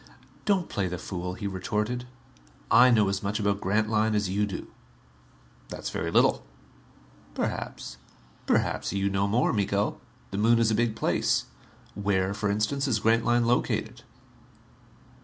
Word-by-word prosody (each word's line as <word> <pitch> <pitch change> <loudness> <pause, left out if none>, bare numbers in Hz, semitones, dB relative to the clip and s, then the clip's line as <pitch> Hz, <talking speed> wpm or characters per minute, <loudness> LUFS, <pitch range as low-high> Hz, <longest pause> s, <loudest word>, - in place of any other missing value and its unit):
"Don't 195 -4 +2
play 100 -2 -2
the 90 0 -4
fool," 90 0 -5
he 100 - -7
retorted. 105 +6 -2 0.6
"I 120 +3 +7
know 110 -4 +4
as 100 0 -1
much 105 +2 -2
about 100 -1 0
Grantline 110 +2 +1
as 105 -2 0
you 105 +2 +1
do." 95 - -7 1.0
"That's - - -5
very - - -2
little." - - +3 0.9
"Perhaps." - - -4 0.5
"Perhaps - - 0
you 100 0 0
know 100 +1 +1
more, 115 +5 +2
Miko. 100 -1 0 0.3
The 95 - -3
Moon 115 +2 +4
is 115 -1 +2
a - - +2
big 115 0 +1
place. - - +1 0.5
Where, 100 -1 0
for 105 0 -2
instance, 110 +8 0
is 120 -5 +2
Grantline 115 +2 +2
located?" 120 +1 0
105 Hz, 140 wpm, -27 LUFS, 100-115 Hz, 1.0 s, I